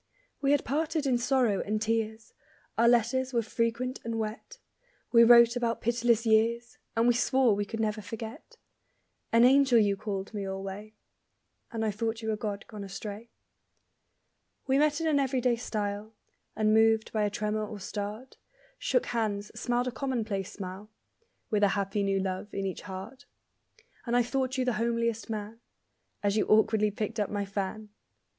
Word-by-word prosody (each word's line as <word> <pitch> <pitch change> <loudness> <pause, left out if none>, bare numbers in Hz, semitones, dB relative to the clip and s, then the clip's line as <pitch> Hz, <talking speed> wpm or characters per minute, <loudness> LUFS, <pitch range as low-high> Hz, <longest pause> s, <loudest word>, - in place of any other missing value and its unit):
We 275 - +1
had 285 0 +3
parted 310 +3 -1
in 250 -3 +2
sorrow 245 -5 +2
and 215 +1 -1
tears; 220 0 -2 0.4
Our 235 +1 +4
letters 245 +3 +2
were 235 -1 +2
frequent 230 +3 -1
and 230 0 -3
wet; 220 - -5 0.5
We 235 -1 +7
wrote 235 0 +7
about 235 -1 -1
pitiless 235 0 +1
years, 230 +2 +2 0.2
And 230 +1 +4
we 245 - +5
swore 250 -1 +3
we 205 0 -1
could 225 +2 -6
never 215 -1 -1
forget. 225 - -8 0.7
An 230 +1 +5
angel 265 -1 +5
you 205 -3 +3
called 195 0 -5
me 205 -2 -3
alway, 195 +2 -6 0.8
And 225 -1 -2
I 215 - +1
thought 225 +2 -3
you 220 - -1
a - - 0
god 210 -1 -4
gone 210 -2 -8
astray. 205 +3 -7 1.4
We 270 0 +2
met 300 +1 +2
in - - -1
an 305 -3 +3
everyday 255 -3 +1
style; 215 -2 -4 0.4
Unmoved 220 +1 +3
by 215 - +1
a 205 - +1
tremor 210 +1 -2
or 205 0 -8
start; 210 +6 -6 0.4
Shook - - +1
hands, 210 -3 -2
smiled 245 +2 -1
a - - -1
commonplace 225 -8 -3
smile; 195 +2 -8 0.6
(With 210 -1 +2
a 205 - +6
happy 200 +1 -1
new 195 -1 +1
love 190 +2 -3
in 195 - -2
each 190 - -4
heart), 205 +10 -9 0.8
And 240 +1 +2
I 245 - +4
thought 260 +2 -1
you 255 - +1
the 250 - +1
homeliest 230 -1 -1
man 215 +1 -5 0.6
As 205 +1 +1
you 215 - +1
awkwardly 215 0 +4
picked 215 +2 -4
up 205 - 0
my 205 -1 -2
fan! 200 +2 -4
225 Hz, 165 wpm, -29 LUFS, 210-240 Hz, 1.4 s, We